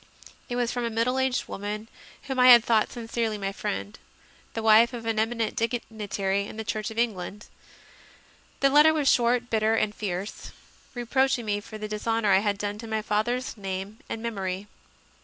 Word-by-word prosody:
It 245 - -2
was 245 -1 0
from 245 - -2
a 235 - 0
middle 230 +3 0
aged 260 -1 0
woman 210 +2 -5 0.4
whom 265 -2 -3
I 250 - +7
had 240 -2 +9
thought 220 -2 +2
sincerely 230 -2 -2
my 195 -1 -3
friend 205 +1 -4 0.6
the 225 - -3
wife 225 +3 +6
of 235 -2 -6
an 225 -1 0
eminent 225 0 -1
digni 230 -3 -3
tary 195 0 0
in - - -10
the 220 - -3
Church 215 -1 -3
of 220 - -10
England. 210 -3 -2 1.2
The 275 0 +4
letter 300 +2 +6
was 295 -3 0
short, 245 0 +3
bitter, 220 0 +2
and 215 -2 0
fierce, 195 -1 -5 0.5
reproaching 250 +1 +1
me 205 -1 0
for 215 +1 -9
the 215 0 -5
dishonour 215 0 0
I 190 - +6
had 205 0 0
done 205 +1 -4
to 230 - -7
my 220 -1 -2
father 215 +3 +1
s 255 0 -5
name 195 +1 -5
and 225 - -5
memory. 195 -4 -3
220 Hz, 190 wpm, -26 LUFS, 210-240 Hz, 1.2 s, had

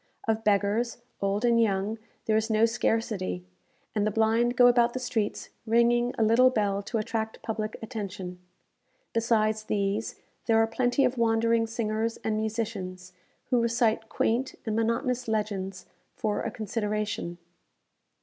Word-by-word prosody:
Of 220 0 +1
beggars, 210 +3 +1 0.2
old 200 +3 0
and 235 -1 +4
young, 205 +1 0 0.3
there 215 - +2
is 220 +1 +1
no 220 0 +4
scarcity; 220 - -1 0.5
and 210 - 0
the 215 - +2
blind 225 +3 +2
go 245 - +7
about 240 -1 +5
the 255 - -2
streets 240 -4 -2 0.2
ringing 240 +2 +3
a 225 - +3
little 230 +4 +6
bell 205 -5 0
to 225 +3 -3
attract 220 0 -3
public 215 -1 -3
attention. 200 -5 -6 0.7
Besides 220 -1 +1
these, 205 +2 -1 0.3
there 225 -1 +4
are 225 - +5
plenty 245 +4 +1
of 250 -1 -1
wandering 230 0 +2
singers 225 0 -2
and 220 - 0
musicians, 210 -5 -4 0.4
who 245 -2 +4
recite 230 -1 +1
quaint 245 +4 0
and 220 -2 -1
monotonous 235 +2 0
legends 200 -4 -2 0.3
"for 210 -1 -1
a - - -2
consideration." 210 -4 -3
220 Hz, 140 wpm, -28 LUFS, 210-230 Hz, 0.7 s, go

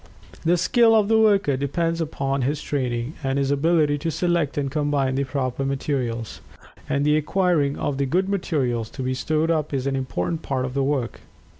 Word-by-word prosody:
The 175 +2 +3
skill 225 +6 +4
of 215 -2 +3
the 225 0 +4
worker 200 -10 +3
depends 165 +5 -1
upon 140 -3 -2
his 140 +4 0
training, 125 -2 -2
and 135 0 0
his 140 0 +1
ability 150 0 +2
to 165 +3 -2
select 170 -3 0
and 140 -2 -1
combine 145 -3 0
the 140 +1 0
proper 130 -1 -2
materials. 130 -4 -3 0.5
And 140 +1 +1
the 150 0 +4
acquiring 155 -2 +1
of 140 - -2
good 185 +6 +1
materials 130 - -1
to 130 - -3
be 130 +1 -1
stored 155 +5 0
up 155 -3 -1
is 130 -1 -2
an 135 -1 0
important 135 - -2
part 130 -4 -2
of 130 - -5
the 140 0 0
work. 135 -4 -1
145 Hz, 185 wpm, -23 LUFS, 135-165 Hz, 0.5 s, skill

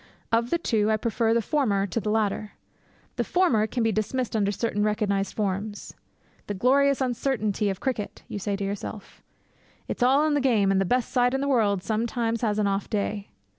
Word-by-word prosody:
Of 230 +1 +2
the 340 - +2
two, 220 -10 +1
I 220 - +3
prefer 225 +1 0
the 230 0 +2
former 215 -10 +1
to 200 +4 -2
the 210 0 -3
latter. 210 -1 -1 0.6
The - - +1
former 255 -13 +2
can 240 +1 -1
be 225 - +2
dismissed 225 +3 -2
under 200 -2 +2
certain 210 0 -1
recognized 205 -2 0
forms. 205 0 -3 0.5
'The 205 - -3
glorious 275 +6 +3
uncertainty 230 -5 0
of 195 -1 -3
cricket!' 245 -6 -3
you 205 - -5
say 200 +1 -2
to 200 - -4
yourself. 200 +1 -6 0.7
'It's - - -5
all 270 +5 +4
in 310 - +1
the 290 - +2
game; 220 -7 +3
and 195 0 +2
the - - +1
best 245 +5 0
side 245 0 +2
in 270 - -1
the 280 - -1
world 210 -8 +2
sometimes 230 +1 -1
has 215 -3 0
an 210 - +2
off 195 0 -1
day!' 205 -1 -2
220 Hz, 200 wpm, -26 LUFS, 205-245 Hz, 0.7 s, all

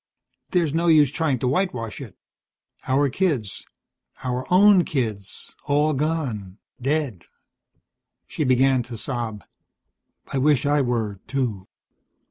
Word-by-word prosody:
There's 170 -5 +1
no 170 +2 +1
use 150 -4 +5
trying 155 -4 0
to 125 - -2
whitewash 125 - -1
it. - - -10 0.7
Our 140 +2 +3
kids, 140 - -1 0.6
our 125 +2 -3
own 195 0 +6
kids, 110 -10 -4
all 150 +1 +2
gone. 130 - -2 0.2
Dead." 135 - -1 1.0
She - - -3
began 130 0 +3
to 120 -1 -7
sob. 115 -4 -4 0.9
"I 135 - +1
wish 145 0 +3
I 145 0 +3
were, 115 -6 -1
too." 120 -8 -2
135 Hz, 115 wpm, -23 LUFS, 120-150 Hz, 1.0 s, own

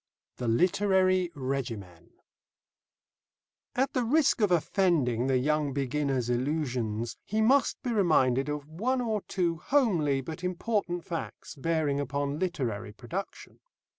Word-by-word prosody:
THE 125 - -3
LITERARY 185 - +3
REGIMEN 115 - -4 1.7
At 265 +2 +1
the 255 - +1
risk 280 0 +3
of 205 -3 +3
offending 155 - +2
the 135 -1 +3
young 150 +1 +1
beginner's 135 -2 -1
illusions, 125 -4 -1
he 215 - -2
must 260 +6 +3
be 250 - -1
reminded 150 - +3
of 150 -1 -4
one 230 +12 -1
or 220 -4 -1
two 170 -3 0
homely 175 - +2
but 160 +6 -7
important 180 -1 -1
facts 165 -2 -6
bearing 155 -1 0
upon 140 +1 -2
literary 120 - -2
production. 165 - -7
155 Hz, 120 wpm, -29 LUFS, 130-190 Hz, 1.7 s, LITERARY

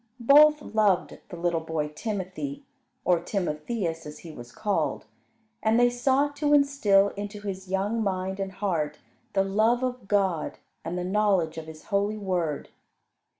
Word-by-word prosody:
Both 295 +4 +6
loved 210 -4 +1
the 175 - -8
little 170 -1 0
boy 160 -2 -3
Timothy, 215 - -5 0.4
or 175 -2 +4
Timotheus 170 -1 -3
as 150 - -9
he 165 - -7
was 120 -4 -11
called, 210 - -1 0.6
and 220 +2 +3
they 245 0 +5
sought 270 +4 +1
to 295 0 +3
instil 220 -9 +4
into 205 +1 -7
his 190 -2 -5
young 200 +4 0
mind 190 -1 -2
and 195 -1 -3
heart 180 -7 -1 0.4
the 195 - +3
love 220 +5 +2
of 250 -5 -3
God 190 -6 0 0.3
and 170 +2 -4
the 180 - -2
knowledge 190 -4 +1
of 160 - -9
His 155 -1 -11
holy 205 +2 +1
Word. 180 -7 -2
195 Hz, 150 wpm, -27 LUFS, 175-225 Hz, 0.6 s, Both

